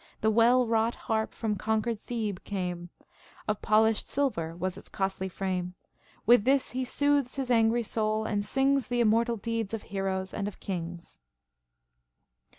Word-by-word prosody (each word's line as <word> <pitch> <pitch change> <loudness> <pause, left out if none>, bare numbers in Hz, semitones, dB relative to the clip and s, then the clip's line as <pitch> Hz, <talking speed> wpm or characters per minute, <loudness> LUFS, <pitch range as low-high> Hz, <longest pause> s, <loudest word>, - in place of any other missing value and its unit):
The 220 - +3
well 240 +3 +5
wrought 225 0 +1
harp 220 -2 -1
from 220 -2 -2
conquered 220 +2 -1
Thehe 215 -6 -3
came; 180 -3 -4 0.6
Of 210 -1 -1
polished 220 0 +3
silver 205 - -1
was 185 +1 -3
its - - -11
costly 190 -1 -2
frame. 185 -1 -3 0.5
With 240 -1 +6
this 270 +2 +2
he 255 +1 -2
soothes 285 0 +1
his 265 -2 -2
angry 230 0 +3
soul, 215 0 -1
and 205 -2 -1
sings 270 +2 +1
The 245 -1 -1
immortal 230 +1 +3
deeds 225 0 -2
of 220 - -7
heroes 190 -1 -2
and 200 -1 -2
of 205 - -7
kings. 175 - -6
220 Hz, 155 wpm, -29 LUFS, 195-235 Hz, 0.6 s, With